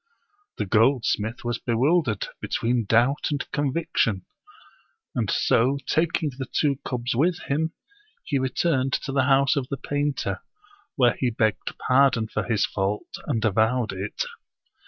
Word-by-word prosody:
The -, -, -1 dB
goldsmith 115 Hz, 0 st, +1 dB
was 120 Hz, -1 st, -1 dB
bewildered 125 Hz, -, +1 dB
between 120 Hz, -1 st, 0 dB
doubt 120 Hz, +7 st, +2 dB
and 145 Hz, -2 st, -2 dB
convic 145 Hz, +2 st, -2 dB
tion; 105 Hz, -7 st, +2 dB, 0.9 s
and 115 Hz, -6 st, -1 dB
so 130 Hz, +5 st, +2 dB
taking 160 Hz, -1 st, +1 dB
the 130 Hz, -, -4 dB
two 140 Hz, -3 st, +1 dB
cubs 120 Hz, -1 st, -2 dB
with 165 Hz, +7 st, +2 dB
him, 160 Hz, +4 st, -1 dB, 0.5 s
he 140 Hz, -4 st, -1 dB
returned 130 Hz, 0 st, 0 dB
to 140 Hz, -, -1 dB
the 135 Hz, -1 st, +2 dB
house 140 Hz, 0 st, +4 dB
of 135 Hz, -3 st, -1 dB
the 140 Hz, -, -3 dB
painter, 145 Hz, 0 st, -2 dB, 0.5 s
where 120 Hz, -4 st, +4 dB
he 130 Hz, -, +2 dB
begged 110 Hz, -2 st, 0 dB
pardon 130 Hz, -4 st, +4 dB
for -, -, -1 dB
his 110 Hz, -4 st, +1 dB
fault, 100 Hz, +1 st, -3 dB
and 115 Hz, -6 st, 0 dB
avowed 110 Hz, +2 st, +2 dB
it. 95 Hz, +2 st, -3 dB
130 Hz, 140 wpm, -25 LUFS, 115-140 Hz, 0.9 s, house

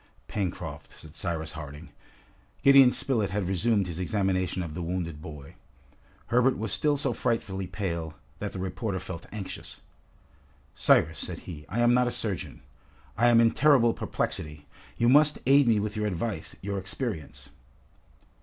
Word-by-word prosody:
"Pencroft!" 95 Hz, -5 st, -5 dB
said 80 Hz, -1 st, -13 dB
Cyrus 80 Hz, -3 st, -3 dB
Harding. 75 Hz, -2 st, -9 dB, 0.7 s
Gideon 135 Hz, -2 st, +8 dB
Spilett 115 Hz, -9 st, +1 dB
had 100 Hz, -1 st, -2 dB
resumed 100 Hz, +2 st, +1 dB
his 85 Hz, -1 st, -6 dB
examination 95 Hz, -1 st, 0 dB
of 80 Hz, -3 st, -6 dB
the 90 Hz, -, -5 dB
wounded 85 Hz, -3 st, -3 dB
boy. 75 Hz, -3 st, -10 dB, 0.7 s
Herbert 125 Hz, +2 st, +3 dB
was 110 Hz, -1 st, -2 dB
still 145 Hz, +7 st, +2 dB
so 140 Hz, 0 st, 0 dB
frightfully 95 Hz, -5 st, -2 dB
pale, 85 Hz, -4 st, -4 dB, 0.2 s
that 105 Hz, -, -3 dB
the -, -, -7 dB
reporter 95 Hz, +2 st, -3 dB
felt 90 Hz, -2 st, -7 dB
anxious. 105 Hz, -3 st, -7 dB, 0.9 s
"Cyrus," 80 Hz, +1 st, +3 dB
said -, -, -6 dB
he, 75 Hz, -4 st, -9 dB
"I 120 Hz, +4 st, -1 dB
am 120 Hz, 0 st, +5 dB
not 125 Hz, 0 st, +3 dB
a -, -, +2 dB
surgeon. 105 Hz, -7 st, -4 dB, 0.5 s
I 120 Hz, -, +3 dB
am 120 Hz, -1 st, +6 dB
in 115 Hz, -1 st, +5 dB
terrible 130 Hz, -6 st, +4 dB
perplexity. 75 Hz, -1 st, -3 dB, 0.3 s
You 120 Hz, -, +2 dB
must 150 Hz, +3 st, +5 dB
aid 140 Hz, 0 st, +5 dB
me 110 Hz, -2 st, +4 dB
with 105 Hz, +1 st, -3 dB
your 105 Hz, 0 st, -1 dB
advice, 100 Hz, +3 st, -4 dB
your 100 Hz, 0 st, -2 dB
experience!" 95 Hz, -, -5 dB
100 Hz, 155 wpm, -27 LUFS, 85-120 Hz, 0.9 s, Gideon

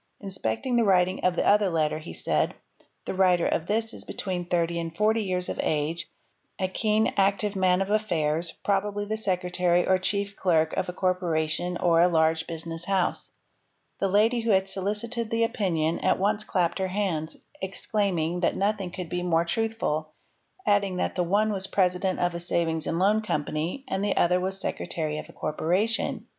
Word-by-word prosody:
Inspecting 195 Hz, -, -2 dB
the 235 Hz, -, +4 dB
writing 185 Hz, -2 st, +2 dB
of 180 Hz, -1 st, +2 dB
the -, -, 0 dB
other 205 Hz, -1 st, +4 dB
letter 155 Hz, -2 st, 0 dB
he 160 Hz, -, -9 dB
said, -, -, 0 dB, 0.2 s
— -, -, -32 dB
"The -, -, -3 dB
writer 185 Hz, -2 st, +3 dB
of 165 Hz, -, 0 dB
this 225 Hz, +2 st, 0 dB
is -, -, -6 dB
between 180 Hz, -3 st, -3 dB
thirty 170 Hz, -1 st, 0 dB
and 165 Hz, 0 st, -5 dB
forty 220 Hz, +1 st, +3 dB
years 180 Hz, -3 st, 0 dB
of -, -, -4 dB
age, 160 Hz, +3 st, -1 dB, 0.5 s
a 185 Hz, -, 0 dB
keen, 215 Hz, +3 st, +1 dB
active 200 Hz, +1 st, +2 dB
man 185 Hz, 0 st, +3 dB
of 195 Hz, -, -6 dB
affairs, 170 Hz, -6 st, 0 dB
probably 205 Hz, +1 st, 0 dB
the 215 Hz, +1 st, -2 dB
secretary 180 Hz, -3 st, +1 dB
or 185 Hz, 0 st, +3 dB
chief 200 Hz, +1 st, -1 dB
clerk 160 Hz, -4 st, +2 dB
of 190 Hz, -1 st, -1 dB
a -, -, -1 dB
corpora 180 Hz, -4 st, 0 dB
tion 175 Hz, +3 st, -2 dB
or 170 Hz, -2 st, +3 dB
a 175 Hz, -, +6 dB
large 160 Hz, -1 st, +2 dB
business 165 Hz, 0 st, -6 dB
house.'' 190 Hz, -2 st, 0 dB, 0.7 s
The 195 Hz, -, +1 dB
lady 215 Hz, +5 st, +3 dB
who 230 Hz, 0 st, -2 dB
had 190 Hz, -2 st, +3 dB
solicited 210 Hz, +5 st, -2 dB
the 230 Hz, 0 st, +1 dB
opinion 170 Hz, -8 st, 0 dB
at -, -, +2 dB
once 205 Hz, +2 st, +1 dB
clapped 175 Hz, -1 st, 0 dB
her 190 Hz, -, 0 dB
hands, 185 Hz, -5 st, -2 dB, 0.2 s
exclaiming 190 Hz, -3 st, -1 dB
that 175 Hz, -, +1 dB
nothing 200 Hz, -2 st, 0 dB
could 180 Hz, -1 st, -6 dB
be 180 Hz, +2 st, -3 dB
more 170 Hz, -1 st, +2 dB
truthful, 170 Hz, -7 st, -1 dB, 0.5 s
adding 200 Hz, -3 st, +2 dB
that -, -, -1 dB
the 180 Hz, -, 0 dB
one 205 Hz, +5 st, +2 dB
was 195 Hz, -1 st, -2 dB
president 185 Hz, -1 st, +1 dB
of 175 Hz, 0 st, +1 dB
a 170 Hz, -, -4 dB
savings 165 Hz, -2 st, -1 dB
and 165 Hz, -, -1 dB
loan 205 Hz, +4 st, +3 dB
company 160 Hz, -, -2 dB
and 190 Hz, +1 st, -2 dB
the 205 Hz, -, 0 dB
other 180 Hz, +1 st, +3 dB
was 190 Hz, +1 st, -2 dB
secretary 155 Hz, -5 st, -3 dB
of -, -, -9 dB
a -, -, -13 dB
corporation. 185 Hz, +9 st, -1 dB
185 Hz, 185 wpm, -26 LUFS, 170-205 Hz, 0.7 s, a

